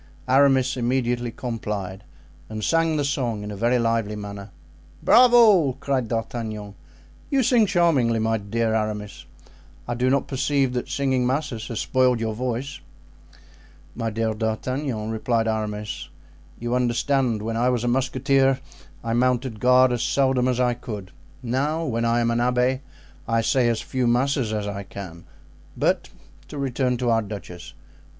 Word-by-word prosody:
Aramis 135 -1 +4
immediately 120 -1 0
complied, 105 -5 -5 0.5
and 110 -1 -5
sang 165 +2 +2
the 145 - +1
song 120 -7 -1
in 105 - -6
a - - -5
very 120 +5 +2
lively 115 -3 0
manner. 100 -1 -7 0.5
"Bravo!" 230 - +6
cried 130 -2 -2
D'Artagnan, 110 -3 -4 0.6
"you 275 -2 +2
sing 230 -2 +4
charmingly, 160 - +2 0.3
dear 115 0 0
Aramis. 105 -2 -3 0.6
I 120 - -1
do 125 +2 +1
not 135 +1 +1
perceive 135 -1 0
that 125 - -3
singing 130 -3 0
masses 130 -4 -2
has 115 - -4
spoiled 125 -2 +2
your 110 -1 -2
voice." 130 +4 -3 1.1
"My 115 -1 -2
dear 110 0 -1
D'Artagnan," 110 +1 -2
replied 115 0 0
Aramis, 105 -1 -3 0.5
"you 120 +1 -3
understand, 125 -2 +1
when 115 +1 -3
I 120 +2 +2
was 120 -2 0
a - - -1
musketeer 135 +1 +2 0.4
I 115 0 -2
mounted 125 -1 0
guard 125 +1 +5
as 120 -2 -1
seldom 130 -2 +2
as 125 -1 0
I 125 -1 +2
could; 105 -6 -7 0.3
now 145 +7 -1
when 115 -4 -1
I 115 +1 +2
am 115 0 +1
an 115 - 0
abbé 125 +1 +1 0.5
I 115 0 +2
say 125 +2 +2
as 115 -2 0
few 130 -2 -1
masses 125 -1 +1
as 105 -1 -2
I 100 -1 -4
can. 95 -4 -9 0.5
But - - +1 0.4
to 150 - -8
return 130 -2 0
to 120 -1 0
our 115 0 +3
duchess." 95 -5 -9
120 Hz, 150 wpm, -23 LUFS, 110-130 Hz, 1.1 s, Bravo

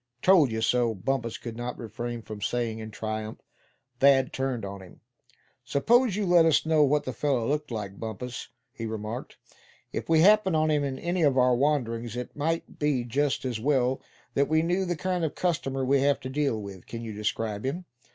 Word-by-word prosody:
"Told 180 -8 +6
you 110 0 -2
so!" 120 -1 +2
Bumpus 115 +4 -2
could 115 -2 -7
not 120 +1 -5
refrain 120 +1 -5
from 110 -2 -8
saying, 115 0 -1
in 110 0 -6
triumph. 110 0 -5 0.6
Thad 135 -1 +5
turned 130 -5 -2
on 100 0 -7
him. 95 - -15 0.6
"Suppose 235 - +3
you 210 -1 0
let 175 -2 +6
us 160 -1 +3
know 160 -1 +4
what 145 +1 +2
the 130 - -4
fellow 125 -2 0
looked 150 +1 -1
like, 100 -4 -5
Bumpus?" 115 +2 -6 0.3
he 115 -4 -5
remarked. 110 +2 -5 0.6
"If - - -4
we 160 -1 +5
happen 200 -1 +5
on 155 0 +2
him 150 -1 +2
in 135 -2 -2
any 175 +1 -1
of 140 -4 +3
our 125 -1 +5
wanderings, 120 -4 0
it 125 - -6
might 165 +3 -2
be 145 -4 +1
just 135 +4 0
as 120 -4 -2
well 130 0 +1 0.3
that 140 0 +2
we 160 +1 +3
knew 180 +3 +1
the 175 -1 -1
kind 180 +2 -1
of 160 - -2
customer 135 -7 -1
we 140 +1 +3
have 140 +1 +2
to 130 - -5
deal 140 -4 0
with. 100 -3 -9
Can 115 0 -6
you 110 -2 -5
describe 105 0 -2
him?" 160 +8 -3
130 Hz, 200 wpm, -27 LUFS, 115-150 Hz, 0.6 s, Told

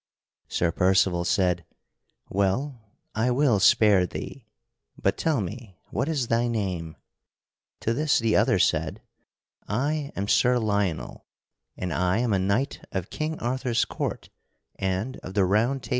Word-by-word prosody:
Sir 85 -1 0
Percival 90 -1 +2
said: 90 -1 +1 0.6
"Well, 115 +7 -1 0.3
I 110 +3 +1
will 125 -4 +3
spare 95 -1 +5
thee, 120 +4 -8 0.5
but 95 - +1
tell 155 -7 0
me, 100 0 -7
what 140 - -1
is 140 -7 -1
thy 115 +1 +1
name?" 95 -8 -3 0.9
To 115 - 0
this 150 +4 +2
the 115 -2 +1
other - - +4
said: - - 0 0.6
"I 140 +6 -1
am 100 +1 -2
Sir 125 +4 +4
Lionel, 100 -6 -2 0.5
and 90 -2 -3
I 90 +2 +1
am 120 -2 +1
a 95 - +2
knight 100 +9 -1
of 95 -2 -4
King 155 +1 -3
Arthur's 125 -1 0
court - - -4 0.5
and 95 +7 -2
of 95 - -9
the 100 -2 +4
Round 115 +8 +1
Table." - - -10
110 Hz, 145 wpm, -26 LUFS, 95-125 Hz, 0.9 s, spare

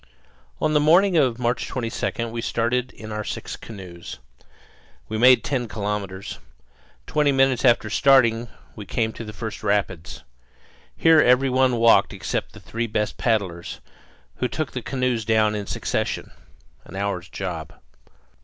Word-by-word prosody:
On 155 - +1
the 150 - +4
morning 175 +6 +4
of 130 -7 +3
March 125 0 -1
22 115 -1 -3
we 115 0 -5
started 120 +2 -1
in 110 0 -10
our 105 0 -3
six - - -5
canoes. 90 -6 -10 0.9
We 110 0 -3
made 125 +1 +6
ten 125 -4 -2
kilometres. 100 -3 -4 0.7
Twenty 150 -1 +2
minutes 135 -2 +2
after 120 -4 +4
starting 120 -3 +4 0.3
we 105 -3 -9
came 110 +1 -1
to - - -7
the 105 - -7
first 110 0 -6
rapids. 95 -5 -2 0.7
Here 165 -1 +6
every 125 +2 +4
one 130 -1 +3
walked 115 -4 +4
except 90 -4 -3
the - - -12
three 115 +1 -4
best 105 -1 -2
paddlers, 100 -7 -1 0.6
who 125 - 0
took 155 +3 -3
the 125 - -4
canoes 125 -2 -1
down 110 -1 +2
in 105 -2 -4
succession - - -2 0.5
an 95 - -12
hour's 100 -2 -3
job. 85 -5 -5
115 Hz, 145 wpm, -23 LUFS, 105-125 Hz, 0.9 s, made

